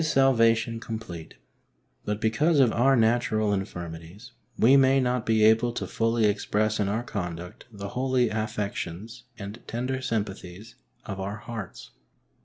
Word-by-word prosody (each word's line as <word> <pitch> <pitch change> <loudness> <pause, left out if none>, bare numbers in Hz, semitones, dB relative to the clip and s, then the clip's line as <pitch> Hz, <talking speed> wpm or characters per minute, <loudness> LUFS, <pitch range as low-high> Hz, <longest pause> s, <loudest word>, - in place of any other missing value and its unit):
salvation 115 -6 +3
complete, 110 -8 -7 0.7
but 105 0 -2
because 145 +9 +2
of 125 -4 +5
our 135 +4 +3
natural 110 -2 +2
infirmities 90 +2 -6 0.3
we 130 +4 +6
may 135 0 +5
not 125 -2 0
be 110 -1 +3
able 110 +2 +4
to - - -4
fully 115 0 +1
express 105 +1 0
in 105 - +1
our 110 +4 -1
conduct 90 -6 -6
the 100 -2 -7
holy 130 0 +1
affections 110 -1 -4
and 100 +3 -8
tender 125 +3 -3
sympathies 105 -3 -4 0.3
of 95 -2 -6
our 100 +2 -4
hearts. 110 -3 -8
110 Hz, 135 wpm, -26 LUFS, 100-120 Hz, 0.7 s, we